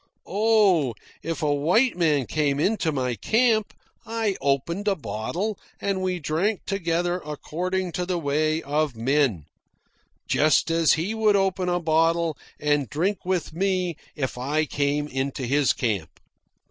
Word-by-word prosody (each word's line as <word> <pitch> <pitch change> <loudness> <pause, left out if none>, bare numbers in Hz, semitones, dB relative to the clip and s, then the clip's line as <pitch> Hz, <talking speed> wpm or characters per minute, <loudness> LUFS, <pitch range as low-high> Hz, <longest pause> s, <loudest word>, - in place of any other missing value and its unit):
Oh, 200 - +3 0.3
if 165 +1 -4
a 145 -1 +2
white 180 - +2
man 155 -6 +2
came 145 -1 0
into 185 -1 +1
my 130 -4 -1
camp, 220 - +2 0.3
I 225 -3 -1
opened 145 +9 0
a 200 - +3
bottle 175 - -3 0.2
and 195 -1 -1
we 185 -1 -1
drank 175 +6 -1
together 175 -2 -1
according 180 +5 -3
to 180 +1 -3
the 180 -1 0
way 155 +1 0
of 145 -1 0
men, 120 - +1 0.8
just 155 +2 +3
as 165 -1 +4
he 170 +7 -1
would 220 -2 +3
open 190 -2 +1
a 175 0 +1
bottle 165 0 +2 0.2
and 145 -4 +1
drink 190 +7 -1
with 180 -4 -1
me 185 -1 0 0.2
if 130 -4 -3
I 150 +5 0
came 145 0 -1
into 135 -1 -3
his 140 +2 +3
camp. 105 - -1
165 Hz, 145 wpm, -25 LUFS, 145-190 Hz, 0.8 s, as